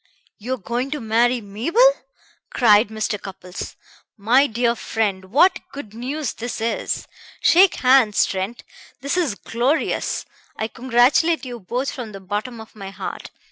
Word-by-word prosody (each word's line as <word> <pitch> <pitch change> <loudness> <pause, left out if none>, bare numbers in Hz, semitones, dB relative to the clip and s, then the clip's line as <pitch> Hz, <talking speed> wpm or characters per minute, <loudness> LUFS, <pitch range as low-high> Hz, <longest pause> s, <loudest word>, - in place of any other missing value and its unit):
"You 250 +5 -2
are - - -13
going 240 +5 -3
to 300 +1 -3
marry 235 +2 +2
Mabel!" 225 - -3 0.7
cried 215 -2 +5
Mr. 215 -1 -3
Cupples. 185 -1 -8 0.4
"My 245 +7 +4
dear 235 0 +1
friend, 210 -5 -2
what 295 - +4
good 275 -7 -9
news 260 +4 -3
this 240 +1 -5
is! 230 +1 -2 0.3
Shake 360 +3 +5
hands, 255 -5 +4
Trent; 195 +5 -4 0.4
this 280 +4 -1
is 325 - 0
glorious! 245 +9 -1 0.3
I 220 - -2
congratulate 260 +7 +2
you 245 -2 -6
both 245 +7 -3
from 230 -5 -7
the 195 - -8
bottom 210 +5 -4
of 220 0 -12
my 195 -2 -8
heart. 195 - -7
235 Hz, 145 wpm, -21 LUFS, 210-260 Hz, 0.7 s, cried